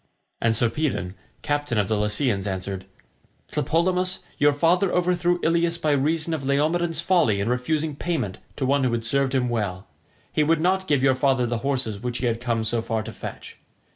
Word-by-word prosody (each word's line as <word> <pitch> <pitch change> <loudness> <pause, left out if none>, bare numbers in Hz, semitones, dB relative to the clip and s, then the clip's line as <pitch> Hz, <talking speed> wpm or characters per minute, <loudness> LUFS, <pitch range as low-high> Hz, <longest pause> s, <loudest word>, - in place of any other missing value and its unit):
And 115 -1 +2
Sarpedon, 115 - 0 0.3
captain 145 -5 -1
of 105 -2 +2
the 110 - +1
Lycians, 105 0 0
answered, 95 0 -4 0.7
"Tlepolemus, 185 +2 0 0.2
your 145 -1 +5
father 170 +6 +2
overthrew 175 0 +1
Ilius 170 +1 +2
by 155 -2 0
reason 155 +3 +1
of 155 -4 -3
Laomedon's 160 +4 +1
folly 170 - +3
in 100 - -1
refusing 150 +5 -1
payment 140 - -2 0.2
to 135 - -2
one 140 +1 +2
who 125 -2 +1
had 115 -1 -2
served 135 +2 +1
him 125 -2 +2
well. 100 -6 -2 0.5
He 155 - +3
would 160 +1 +2
not 190 +3 +1
give 145 -5 +2
your 135 -1 +5
father 130 -1 +2
the 120 -1 -2
horses 125 -5 -2
which 125 0 -3
he 125 - -2
had 115 -1 0
come 115 -2 0
so 115 +1 -1
far 110 -1 -2
to - - -8
fetch. - - -8
135 Hz, 185 wpm, -24 LUFS, 115-165 Hz, 0.7 s, your